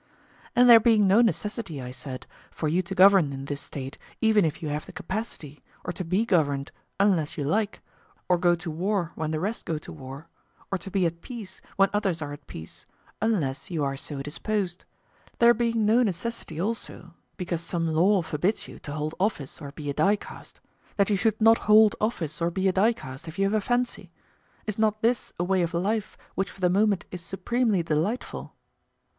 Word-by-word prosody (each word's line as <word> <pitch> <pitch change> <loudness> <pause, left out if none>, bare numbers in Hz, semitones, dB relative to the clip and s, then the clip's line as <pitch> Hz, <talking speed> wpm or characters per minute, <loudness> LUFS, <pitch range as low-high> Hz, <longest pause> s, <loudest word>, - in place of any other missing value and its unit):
And 245 +1 +6
there 235 -1 +10
being 220 -2 +4
no 195 +4 +6
necessity, 210 - -1
I 125 -1 -6
said, 130 0 -8 0.2
for 155 - -3
you 170 +5 +2
to 185 +2 -6
govern 190 -5 +6
in 135 0 -6
this 145 0 -4
State, 135 0 -6 0.2
even 220 -2 +4
if 160 +1 -3
you 155 - -2
have 150 +1 -3
the - - -9
capacity, 185 -7 -5 0.2
or 180 - -2
to 185 - -4
be 185 +6 +1
governed, 145 -9 +1 0.3
unless 185 -7 +2
you 145 - -1
like, 205 +8 0 0.5
or 180 -1 +3
go 175 0 +4
to 170 -1 -5
war 180 +1 -1
when 155 -1 -3
the 155 0 -1
rest 210 +7 -3
go 165 -3 -2
to 150 - -9
war, 140 +2 -9 0.4
or 195 - 0
to 195 - -8
be 190 -2 +1
at 170 0 -2
peace 220 -5 -8
when 195 0 +4
others 195 -5 0
are 145 -2 -5
at 145 -1 -12
peace, 80 0 -10 0.3
unless 155 -12 0
you 165 -5 -1
are 135 -1 -1
so 135 0 -5
disposed—there 200 +7 -1
being 230 -2 +1
no 225 +4 +5
necessity 200 -5 -2
also, 190 -3 -4 0.2
because 175 -2 -3
some 170 0 -2
law 175 +4 +3
forbids 175 +7 -1
you - - -11
to 145 - -7
hold 155 +1 -3
office 180 -8 -1
or 140 -2 -7
be 150 0 -8
a 140 - -1
dicast, 200 +7 -1 0.4
that 200 0 +3
you - - +4
should 220 +2 +1
not 225 +1 +6
hold 215 0 +7
office 170 -8 -2
or 170 - +2
be 190 +2 0
a 190 - +2
dicast, 175 - 0
if 160 +3 -8
you 195 - +2
have 200 - +1
a 215 - +2
fancy—is 215 -2 -4
not 215 0 +1
this 240 +1 +1
a - - +2
way 185 +1 +2
of 170 0 -1
life 205 +4 -1 0.2
which 195 - -1
for - - -15
the 180 -1 +3
moment 200 -1 +2
is 180 - -6
supremely 195 +2 0
delightful? 165 +10 -2
185 Hz, 195 wpm, -26 LUFS, 155-210 Hz, 0.5 s, there